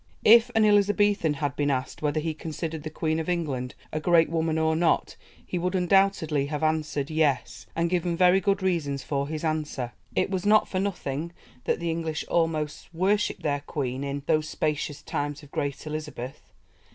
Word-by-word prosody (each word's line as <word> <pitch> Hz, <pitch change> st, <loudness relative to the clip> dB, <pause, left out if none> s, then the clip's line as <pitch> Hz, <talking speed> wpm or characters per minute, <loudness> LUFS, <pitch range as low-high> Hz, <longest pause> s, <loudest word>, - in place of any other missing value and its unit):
If 230 Hz, +2 st, +8 dB
an 220 Hz, -1 st, +5 dB
Elizabethan 205 Hz, -5 st, +3 dB
had 145 Hz, -1 st, -2 dB
been 145 Hz, -1 st, 0 dB
asked 130 Hz, -2 st, -2 dB
whether 150 Hz, 0 st, +1 dB
he 160 Hz, +1 st, -2 dB
considered 160 Hz, 0 st, -5 dB
the 155 Hz, -, -5 dB
Queen 160 Hz, +1 st, -1 dB
of 160 Hz, -, -3 dB
England 140 Hz, -8 st, -2 dB, 0.2 s
a 155 Hz, -, 0 dB
great 165 Hz, 0 st, +4 dB
woman 160 Hz, -1 st, 0 dB
or 160 Hz, 0 st, +2 dB
not, 165 Hz, 0 st, +1 dB, 0.3 s
he 180 Hz, -, -3 dB
would 180 Hz, +2 st, -1 dB
undoubtedly 180 Hz, -6 st, +2 dB
have 150 Hz, +1 st, -3 dB
answered 155 Hz, -2 st, 0 dB
"Yes," 155 Hz, -4 st, 0 dB
and 170 Hz, +1 st, +1 dB
given 175 Hz, -1 st, 0 dB
very 180 Hz, +1 st, +5 dB
good 200 Hz, -1 st, +1 dB
reasons 145 Hz, -7 st, 0 dB
for 140 Hz, 0 st, -1 dB
his 155 Hz, +1 st, -4 dB
answer. 150 Hz, -6 st, -2 dB, 0.2 s
It -, -, +1 dB
was 185 Hz, -2 st, -1 dB
not 215 Hz, +1 st, +5 dB
for 185 Hz, -, -2 dB
nothing 170 Hz, -5 st, -3 dB, 0.3 s
that -, -, +1 dB
the 170 Hz, -1 st, -1 dB
English 160 Hz, -2 st, -3 dB
almost 160 Hz, -3 st, -1 dB
worshipped 195 Hz, +5 st, 0 dB
their 145 Hz, -1 st, 0 dB
Queen 130 Hz, -2 st, -3 dB
in 140 Hz, 0 st, -3 dB
"those 155 Hz, 0 st, +1 dB
spacious 150 Hz, -1 st, -2 dB
times 145 Hz, +1 st, -3 dB
of 145 Hz, -, -15 dB
great 140 Hz, +1 st, -3 dB
Elizabeth." 150 Hz, -4 st, -6 dB
160 Hz, 180 wpm, -26 LUFS, 145-175 Hz, 0.3 s, If